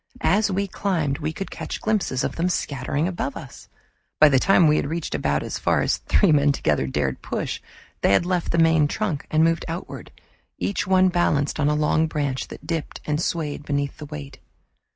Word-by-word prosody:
As 210 +2 +3
we 200 +1 0
climbed 165 -8 -1
we 155 +1 -2
could 195 +4 -6
catch - - -5
glimpses 205 -12 0
of - - -2
them 170 +2 0
scattering 145 -1 -1
above 175 -6 -3
us. 135 - -11 0.5
By 155 - +8
the 135 -2 +4
time 180 +2 +4
we 150 0 +4
had - - 0
reached 165 +2 -3
about 70 -1 0
as - - -4
far - - +2
as - - +1
three 195 - +2
men 145 -1 +4
together 75 - 0
dared 65 -1 -2
push, - - -4 0.4
they - - +3
had 100 - +4
left 180 -1 -1
the 170 - 0
main 165 -2 +4
trunk 170 -4 -3
and 155 +1 +3
moved 165 0 +2
outward, 165 +2 -6 0.5
each 200 - -2
one 185 0 +4
balanced 155 -5 +1
on 145 0 +2
a 150 - +1
long 155 +1 +2
branch 145 -4 -2
that - - -11
dipped 165 -2 -4
and 150 +1 -1
swayed 150 -4 -2
beneath 140 -1 -2
the 150 - -7
weight. 140 -3 -8
155 Hz, 200 wpm, -23 LUFS, 140-175 Hz, 0.5 s, By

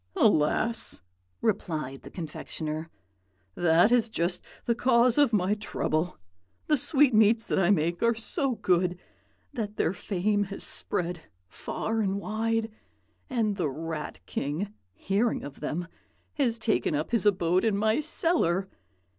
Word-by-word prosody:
"'Alas!' 210 - +2 0.4
replied 155 - -1
the - - -11
confectioner. 160 -1 -5 0.6
'That 175 - +4
is 235 -2 +3
just 175 -3 -1 0.2
the 235 - +2
cause 240 +1 +3
of 285 -5 +5
my 200 -2 +2
trouble. 180 -5 -2 0.5
The 300 - +3
sweetmeats 230 -6 +4
that - - 0
I 180 -1 +3
make 170 -2 +2
are 235 0 +3
so 260 +3 -1
good 180 -3 +1 0.6
that 215 -5 -4
their 170 - +1
fame 205 +2 0
has 195 0 -6
spread 175 -1 -2 0.3
far 220 - -3
and 195 -1 0
wide, 225 +2 -1 0.6
and 220 -5 0
the 165 -6 0
Rat 155 +2 -5
King, 160 +9 -3 0.2
hearing 205 - 0
of 140 -1 -9
them, 170 +4 -3 0.5
has 245 -6 +1
taken 215 -9 +1
up 150 +8 -2
his 225 -3 +2
abode 180 -2 +2
in 220 -3 +2
my 220 +4 +2
cellar. 300 - +1
200 Hz, 135 wpm, -28 LUFS, 170-225 Hz, 0.6 s, of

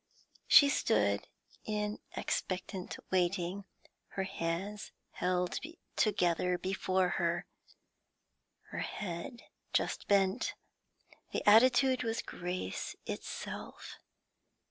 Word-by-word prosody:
She 285 - +9
stood 280 - +2 0.4
in 210 0 -2 0.2
expectant 185 0 -2
waiting, 185 +1 +1 0.4
her 195 - -3
hands 190 +3 -3 0.2
held 180 0 0 0.4
together 180 -3 +2
before 190 0 +1
her, 170 0 0 1.3
her - - -4
head 195 +5 -5 0.3
just - - 0
bent. 195 +2 +2 0.8
The - - -2
attitude 255 +4 +6
was 225 -1 -1
grace 180 - -4
itself. - - -6
190 Hz, 80 wpm, -33 LUFS, 180-210 Hz, 1.3 s, She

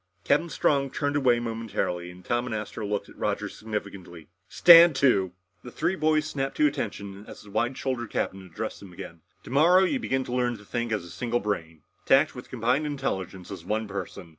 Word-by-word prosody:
Captain 155 +4 +2
Strong 140 -3 +1
turned 145 +1 -2
away 125 -4 +3
momentarily 115 -7 -3
and 90 0 -14
Tom 120 +1 0
and 115 - -3
Astro 105 0 -5
looked 105 0 -2
at - - -16
Roger - - -1
significantly. 100 -6 -7 0.2
"Stand 170 -2 +8
to!" 100 -10 +3 0.3
The 125 - -8
three 180 +9 -1
boys 155 -3 +2
snapped 135 -3 -3
to 150 - +4
attention 100 -7 -3
as - - -11
the 105 - -14
wide 120 +5 0
shouldered 125 -4 -3
captain 95 - -2
addressed 90 -3 -6
them 95 -3 -12
again. 85 -3 -10 0.2
"Tomorrow 170 +8 +4
you 260 +8 +1
begin 130 - -1
to 125 - -6
learn 125 -1 +1
how 110 - -10
to - - -16
think 120 0 -3
as 105 -5 -1
a 85 - -11
single 120 0 -1
brain. 80 -8 -4 0.2
To - - +7
act 145 +3 +2
with 125 - -10
combined 130 +5 0
intelligence 95 - -4
as 95 -4 -7
one 110 +4 -2
person. 100 -3 -6
120 Hz, 205 wpm, -26 LUFS, 100-135 Hz, 0.3 s, Stand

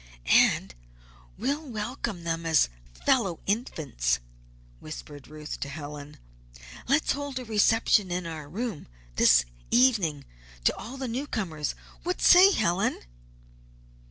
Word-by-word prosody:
"And 65 +1 +4 0.6
we'll 275 +8 -1
welcome 225 - -5
them 165 0 -2
as 160 - +3 0.4
fellow 195 -10 +2
infants," 150 - -1 0.6
whispered 145 -2 -9
Ruth 150 0 -7
to 140 - -4
Helen. 145 0 -8 0.7
"Let's 280 +4 +2
hold 285 -1 -3
a 255 - -5
reception 220 -2 +3
in 180 0 -2
our 155 -3 -7
room 215 0 -5 0.3
this - - +6 0.2
evening 210 - +3 0.4
to - - +3
all 255 +5 -8
the 265 -1 -4
newcomers. 215 - -3 0.3
What 360 +1 -2
say, 370 +2 +8
Helen?" 195 - 0
195 Hz, 115 wpm, -27 LUFS, 155-250 Hz, 0.7 s, say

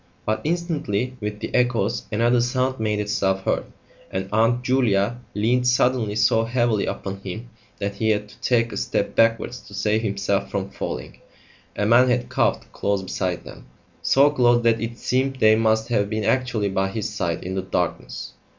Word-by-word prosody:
But, 110 0 0
instantly, 150 - -1
with 105 0 -4
the - - -5
echoes, 120 -5 +1
another 120 +3 +3
sound 130 +1 0
made 105 -1 0
itself 95 -2 0
heard, - - 0 0.4
and 95 0 -3
Aunt 115 +3 +2
Julia 120 -4 +2 0.2
leaned 125 +4 +2
suddenly 125 -3 +2
so 110 +1 +3
heavily 115 -3 +1
upon 95 0 -4
him 100 +5 -7 0.3
that 100 0 -4
he 110 +1 +1
had 105 -1 +1
to - - -18
take 115 -2 +2
a - - -5
step - - -1
backwards 115 +2 +2
to 105 -2 -13
save 110 +2 +1
himself 100 -2 -1
from 100 -1 -3
falling. - - -6 0.6
A 105 - 0
man 120 +4 +5
had 125 0 0
coughed - - 0
close 100 -1 -1
beside 90 -2 -3
them - - -12 0.3
so 140 +2 +4
close 120 -4 +3
that 115 -1 +3
it 115 +1 -4
seemed 135 +1 0
they 110 -4 +5
must 110 +1 +1
have 100 -4 +1
been 110 0 -2
actually 120 -4 +1
by 95 0 0
his 110 +1 -3
side 85 -5 -3
in 95 - -4
the 95 - -1
darkness. 90 -2 -3
110 Hz, 180 wpm, -23 LUFS, 100-125 Hz, 0.6 s, man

